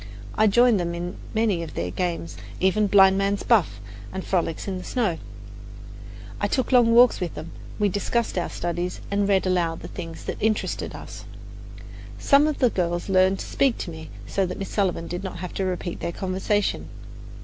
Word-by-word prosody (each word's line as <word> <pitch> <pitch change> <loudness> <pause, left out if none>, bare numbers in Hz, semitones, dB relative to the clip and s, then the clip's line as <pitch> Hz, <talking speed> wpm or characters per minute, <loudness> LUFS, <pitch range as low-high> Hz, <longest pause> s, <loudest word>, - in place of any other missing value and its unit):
I 215 - +3
joined 240 +1 +5
them 170 -1 -2
in 175 +1 -5 0.2
many 215 -6 +2
of 165 - -7
their 90 +1 -2
games, 170 - -3 0.2
even 205 +3 +2
blind 195 -1 +6
man's 200 0 0
buff 170 - +2 0.3
and 190 - -5
frolics 170 -2 -1
in 190 -2 -3
the - - -8
snow; 215 -10 -1 1.2
I - - +1
took 260 -1 -1
long 235 -2 +5
walks 245 0 +6
with 180 -3 -4
them; 160 +2 -7 0.3
we 210 - +2
discussed 205 +4 -1
our 175 - -1
studies 175 +1 -3
and 200 0 +1
read 195 -1 +3
aloud 175 -3 0
the - - -7
things 165 -1 -8
that - - -4
interested 215 0 -1
us. - - -9 0.9
Some 285 +2 +4
of 305 - -1
the 250 -3 +3
girls 175 -1 -1
learned 190 0 +4
to - - -5
speak 270 -4 +1
to 175 - -5
me, 160 -1 -9 0.2
so 195 - 0
that 180 - -5
Miss 195 - -5
Sullivan 185 -5 0
did 175 +2 -5
not 190 -2 -5
have 180 0 -6
to 195 - -1
repeat 180 -1 -3
their - - -3
conversation. 190 +3 -1
190 Hz, 190 wpm, -24 LUFS, 175-210 Hz, 1.2 s, blind